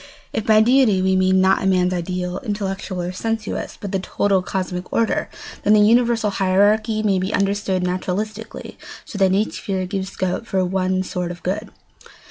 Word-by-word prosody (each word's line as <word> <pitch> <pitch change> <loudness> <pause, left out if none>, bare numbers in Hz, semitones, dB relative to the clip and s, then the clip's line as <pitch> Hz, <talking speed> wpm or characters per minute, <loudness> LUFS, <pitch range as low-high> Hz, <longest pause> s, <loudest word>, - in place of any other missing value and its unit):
If 220 - -3
by 215 -1 +6
deity 240 -4 +4
we 190 0 +2
mean 185 0 +3
not 190 0 +3
man's 185 -1 +2
ideal—intellectual 185 +2 -3
or 175 - -3
sensuous—but 215 -1 -4
the 195 - 0
total 195 0 +1
cosmic 180 -1 -4
order, 230 -1 0 0.3
then 210 - +3
the 215 - +6
universal 235 -1 +3
hierarchy 205 +3 +2
may 195 -3 +2
be 190 +2 -2
understood 200 -2 0
naturalistically 200 +4 -4 0.3
so 205 - -7
that 190 -1 +4
each 205 +3 0
sphere 190 -2 -3
gives 190 0 -3
scope 185 +4 -3
for 190 -1 0
one 185 0 0
sort 180 -1 -3
of 175 0 -9
good. 200 +4 -3
195 Hz, 160 wpm, -21 LUFS, 185-215 Hz, 0.3 s, by